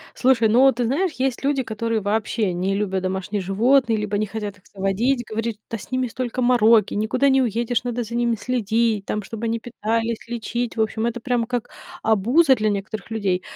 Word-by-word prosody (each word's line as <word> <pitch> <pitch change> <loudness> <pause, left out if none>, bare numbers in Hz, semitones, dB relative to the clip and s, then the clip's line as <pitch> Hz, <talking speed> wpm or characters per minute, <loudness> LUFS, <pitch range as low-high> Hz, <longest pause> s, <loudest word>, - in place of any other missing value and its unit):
Слушай, 250 -3 +3
ну 230 +4 +3
вот, 270 -2 +6
ты 245 -1 0
знаешь, 315 +8 0
есть 260 0 -2
люди, 275 -2 +1
которые 225 0 -2
вообще 210 -1 -1
не 190 +3 -1
любят 190 -2 -1
домашних 190 +2 -2
животные, 225 +5 +3
либо 210 -1 -2
не 215 - 0
хотят 205 -2 -6
их - - -32
заводить, 210 +7 0
говорят 225 0 -3
что, 215 - -40
да, 230 - -2
с - - -12
ними 255 0 0
столько 250 +1 -3
мороки, 230 -3 +4
никуда 220 +6 +1
не 265 0 +4
уедешь, 235 +1 0
надо 245 0 -2
за 230 +2 -9
ними 235 -1 +1
следить, 225 -2 0
там, 210 -1 -2
чтоб 225 +2 -8
они 230 0 0
питались, 230 0 -2
лечить. 240 0 -3
В - - +2
общем, 220 +1 0
это 240 0 -3
прям 240 -1 0
как 245 -1 -3 0.3
обуза 240 - +4
для 215 -1 0
некоторых 200 +2 -4
людей. 195 -5 -1
225 Hz, 205 wpm, -22 LUFS, 210-245 Hz, 0.3 s, вот